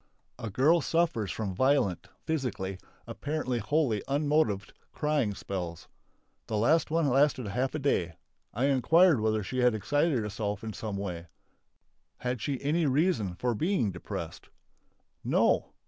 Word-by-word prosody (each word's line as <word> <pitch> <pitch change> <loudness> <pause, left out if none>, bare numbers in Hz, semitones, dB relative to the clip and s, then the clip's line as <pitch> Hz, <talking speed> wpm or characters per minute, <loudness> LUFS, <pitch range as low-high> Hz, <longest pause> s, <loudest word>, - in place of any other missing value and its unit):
A 115 - -4
girl 150 - +3
suffers 155 - 0
from 105 -4 -3
violent 100 - +1 0.2
(psychically), 100 - -2 0.3
apparently 145 -5 -3
wholly 120 -3 +1
unmotived 145 -7 +1 0.2
crying 150 -9 0
spells. 85 -5 -5 0.6
The 110 - -1
last 155 +10 +3
one 165 -1 +1
lasted 135 -1 +3
half 125 +8 -1
a - - +1
day. 90 - 0 0.4
I 120 +5 0
inquired 145 +4 +4
whether 110 -1 0
she 130 +6 -3
had 125 -2 +4
excited 145 +7 +1
herself 105 -1 -3
in 110 -1 -5
some 105 -2 -4
way. 90 -4 -5 0.9
Had 125 -2 -3
she 140 -3 -2
any 155 +3 +1
reason 135 - +1
for 125 +5 -1
being 155 - 0
depressed? 85 - -7 0.7
No! - - +2
125 Hz, 135 wpm, -29 LUFS, 105-150 Hz, 0.9 s, inquired